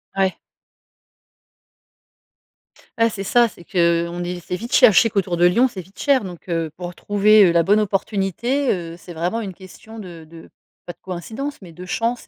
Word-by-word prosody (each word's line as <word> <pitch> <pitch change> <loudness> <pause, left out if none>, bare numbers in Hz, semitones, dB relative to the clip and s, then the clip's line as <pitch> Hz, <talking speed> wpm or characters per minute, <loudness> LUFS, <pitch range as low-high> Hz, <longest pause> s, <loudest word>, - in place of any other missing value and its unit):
Ouais. 190 -1 0 2.6
Ouais, 230 0 +4
c'est 195 -2 -6
ça. 240 +4 +3
C'est 175 - -14
que, 170 -2 +1
on 175 0 -5
est 180 0 -4
c'est 175 - -5
vite 230 +6 -7
cher, - - +7
je 195 - +6
sais 230 - +1
qu'autour 190 -3 -1
de 175 +1 +3
Lyon, 235 +9 +4
c'est 195 -7 -8
vite 190 +3 -21
cher 275 -5 +2
donc, 180 -1 -10
heu, 165 -2 -2
pour 175 0 -6
trouver, 205 +3 +4
heu, 175 - +4
la 170 0 +3
bonne 205 +4 +3
opportunité, 210 - -1
heu, 170 -2 -4
c'est 175 0 -11
vraiment 180 +8 -2
une 195 -4 -6
question 200 +4 -13
de 175 -6 -10
de, 165 0 -14 0.3
pas 175 - -7
de - - -42
coïncidence, 220 +11 -6
mais 175 - -12
de 180 +3 -10
chance 230 +5 -2
190 Hz, 195 wpm, -21 LUFS, 175-220 Hz, 2.6 s, cher